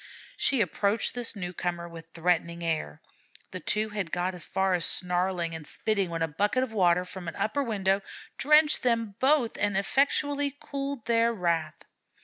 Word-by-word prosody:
She 265 -4 +2
approached 200 +4 0
this 240 -2 -4
newcomer 175 -2 -4
with 165 -1 -11
threatening 170 0 0
air. 155 - -2 0.5
The - - -5
two 215 +1 -1
had 205 -6 -4
got 180 +1 -1
as 180 - +1
far 190 0 +1
as 175 -2 +1
snarling 180 -1 +1
and 160 -2 -7
spitting 200 -4 -1
when 165 -1 -2
a - - +1
bucket 205 +11 +1
of 255 - -5
water 180 -3 +3
from 180 -1 -8
an 165 - -5
upper 215 +8 0
window 200 -5 +1 0.4
drenched 300 +2 +5
them 230 -4 0
both 265 -3 +2
and 205 -2 +1
effectually 285 +5 +1
cooled 275 -3 -5
their 230 0 +3
wrath. 170 -7 -1
195 Hz, 165 wpm, -28 LUFS, 175-230 Hz, 0.5 s, drenched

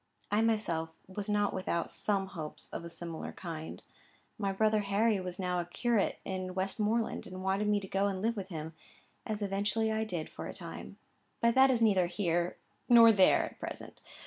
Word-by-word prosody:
I 210 +1 +3
myself 210 -8 +1 0.2
was 200 +2 -6
not 205 0 +2
without 180 -2 -2
some 200 -2 0
hopes 165 -5 -8
of - - -4
a 170 - -7
similar 170 -1 -6
kind. 160 -3 -7 0.6
My 200 -2 0
brother 215 +2 +3
Harry 205 +1 +2
was 180 -1 -5
now 180 -1 -1
a 175 - -2
curate 220 +4 0
in 185 -1 -4
Westmoreland, 210 +4 0
and 185 0 -7
wanted 195 +2 +1
me 210 -1 +3
to 195 - -7
go 195 +1 +1
and 195 -2 -2
live 225 +4 0
with 195 -3 -5
him, 160 -2 -5 0.5
as 215 -1 -2
eventually 205 +3 0
I 220 0 0
did 175 -7 -4
for - - -7
a - - -7
time. - - -8 0.4
But 235 0 +3
that 265 +2 +6
is 240 -3 +3
neither 190 -5 +4
here 175 -2 0 0.3
nor 230 -1 +9
there 195 -3 +5
at - - -11
present. - - -7
195 Hz, 190 wpm, -32 LUFS, 180-215 Hz, 0.6 s, nor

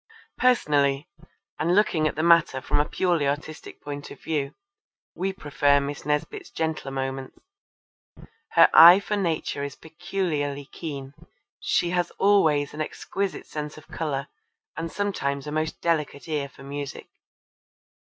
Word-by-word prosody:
Personally, 145 - +2 0.5
and 170 +3 +2
looking 170 -7 +3
at - - -3
the 155 - -1
matter 170 -5 +4
from 130 - 0
a 150 - 0
purely 170 -6 +1
artistic 150 +2 -5
point 145 0 -6
of - - -11
view, 145 -4 -2 0.6
we 190 +2 -2
prefer 145 -5 +2
Miss 140 +1 -5
Nesbit's 335 - -2
gentler 160 -4 -3
moments. 135 0 -4 1.2
Her 165 -1 +8
eye 175 +4 +10
for 210 +1 -2
Nature 165 -7 -1
is 140 -1 -5
peculiarly 160 -4 -3
keen. 140 -2 -7 0.5
She 175 - +1
has 175 -1 0
always 160 -8 +3
an 155 - -4
exquisite 195 +5 -3
sense 150 0 -6
of 155 - -15
colour 145 -3 -3 0.5
and 165 0 -4
sometimes 140 -9 -2
a 150 - -5
most 155 +1 -2
delicate 155 -4 -1
ear 150 -3 -2
for 135 - -15
music. 140 0 -6
150 Hz, 140 wpm, -25 LUFS, 140-170 Hz, 1.2 s, eye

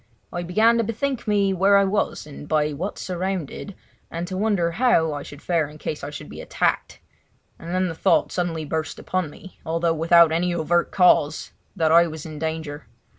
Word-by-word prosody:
I 175 - -2
began 220 +7 +3
to - - +2
bethink 235 +3 -3
me 200 -2 +2
where 195 +2 +4
I 200 - +5
was 195 -4 -1
and 145 0 -10
by 150 -1 +1
what 175 +8 -4
surrounded, 185 +1 -4 0.3
and 170 +1 -4
to 185 - -5
wonder 190 -4 +1
how 170 -7 +2
I 145 - -4
should 145 0 -11
fare 165 -4 +1
in 150 - -12
case 155 0 -5
I 145 - -4
should 145 - -8
be - - -9
attacked; - - -1 0.6
and 165 - -8
then 185 +1 +1
the 165 - -4
thought 185 +4 +2
suddenly 165 -3 -2
burst 160 +1 -3
upon 185 -4 -2
me, 185 +5 -14
although 165 +1 0
without 165 +1 +5
any 175 +2 0
overt 175 +1 +1
cause, 160 -4 +3 0.2
that 160 -4 +2
I 170 +1 +6
was 155 -2 -8
in 155 -2 -8
danger. 160 -3 -4
170 Hz, 195 wpm, -23 LUFS, 155-190 Hz, 0.6 s, I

